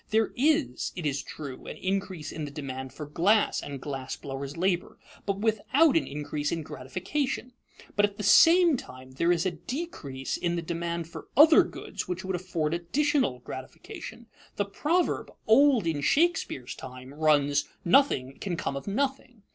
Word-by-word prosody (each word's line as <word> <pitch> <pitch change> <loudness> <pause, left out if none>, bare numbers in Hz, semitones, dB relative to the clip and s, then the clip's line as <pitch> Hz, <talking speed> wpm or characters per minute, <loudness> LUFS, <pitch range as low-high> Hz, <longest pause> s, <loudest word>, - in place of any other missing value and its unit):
There 220 0 +2
is, 305 +3 +1
it 175 - -5
is 140 -2 0
true, 140 -4 -8
an - - -7
increase 190 -4 -3
in 155 -1 -4
the - - -6
demand 130 -2 -6
for 150 +3 -7
glass 180 +8 +2
and 140 -1 -6
glass 135 -1 -5
blowers' 140 +1 -6
labor, 180 0 0 0.3
but 200 -1 0
without 260 +8 +3
an 330 - +2
increase 145 +1 -3
in 165 -2 -2
gratification; 250 - -3 0.4
but 205 - +3
at 205 0 -6
the 210 - -4
same 330 - +6
time 130 - -11
there 170 +7 +1
is 175 0 +1
a 185 - +1
decrease 170 - -5
in 175 0 -1
the 170 - -2
demand 170 0 -3
for 170 - -10
other 315 +2 +9
goods - - -6
which 180 +2 -4
would 190 -1 -1
afford 170 -4 -2
additional 175 - 0
gratification. 130 - -9 0.3
The 205 - 0
proverb, 310 - 0 0.2
old 250 -2 +5
in 160 -3 -1
Shakespeare's 290 - +1
time, 130 +1 -10
runs, 145 -2 +3 0.2
"Nothing 170 - +3
can 180 -4 -3
come 140 - -2
of 140 - -6
nothing." 255 0 -2
175 Hz, 165 wpm, -28 LUFS, 145-235 Hz, 0.4 s, other